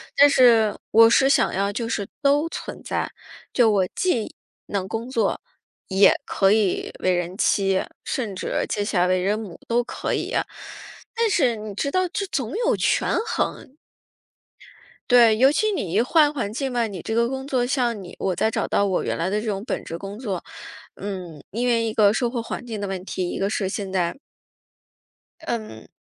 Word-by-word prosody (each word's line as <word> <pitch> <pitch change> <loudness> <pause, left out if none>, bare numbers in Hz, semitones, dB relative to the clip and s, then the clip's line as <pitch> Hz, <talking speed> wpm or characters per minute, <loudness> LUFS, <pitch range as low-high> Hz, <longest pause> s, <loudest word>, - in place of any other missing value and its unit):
但 285 +1 +7
是 235 -6 +5 0.2
我 225 +1 +7
是 265 +3 +4
想 - - +3
要 200 +1 0
就 230 +2 -3
是 200 -3 -2
都 290 +2 +3
存 - - -7
在， - - -2 0.4
就 240 -3 +4
我 195 -3 +2
既 260 - 0 0.3
能 195 -2 -2
工 225 +4 -4
作， 235 -3 0 0.5
也 190 +1 +5
可 195 -1 +2
以 210 -3 +1
为 185 - +1
人 175 +1 -2
妻， 195 -3 +2 0.2
甚 220 -7 -3
至 185 - -2
接 205 - -1
下 205 -4 +1
来 180 - +3
为 185 0 +2
人 200 +3 +1
母 205 -6 -9
都 240 +1 +2
可 - - -4
以 - - -1
呀。 - - 0 0.7
但 460 -1 +2
是 265 - +2
你 210 -1 -7
知 280 +7 -1
道 370 +2 +1
这 395 - -2
总 260 -10 -3
有 - - +3
权 - - +1
衡， 270 - -3 1.3
对， 235 -3 +6
尤 260 +4 +5
其 430 +8 +1
你 200 - -3
一 200 - +3
换 295 +4 +4
环 235 -8 -3
境 265 +3 -2
嘛， 240 -2 0
你 195 -5 -7
这 - - -4
个 235 +1 +2
工 265 +1 -4
作 255 -3 0
像 245 -4 0
你 180 - -10
我 185 -2 -1
在 220 - +2
找 - - -2
到 200 - +2
我 190 -2 0
原 - - -2
来 170 +3 0
的 210 +2 0
这 225 - -7
种 200 -1 -2
本 - - -3
职 165 - -6
工 195 +2 -7
作 200 -8 -4 0.5
嗯， 180 -6 -7
因 240 +4 -2
为 235 -2 +2
一 225 - -1
个 210 -2 +4
生 240 +2 0
活 240 -1 -2
环 230 - -6
境 225 -4 -5
的 200 - -2
问 190 -1 -5
题， 185 -2 -3
一 - - -4
个 195 +1 0
是 200 -3 -1
现 195 0 -4
在 175 -3 0 1.3
嗯， 215 - -5
220 Hz, 215 characters per minute, -23 LUFS, 195-245 Hz, 1.3 s, 但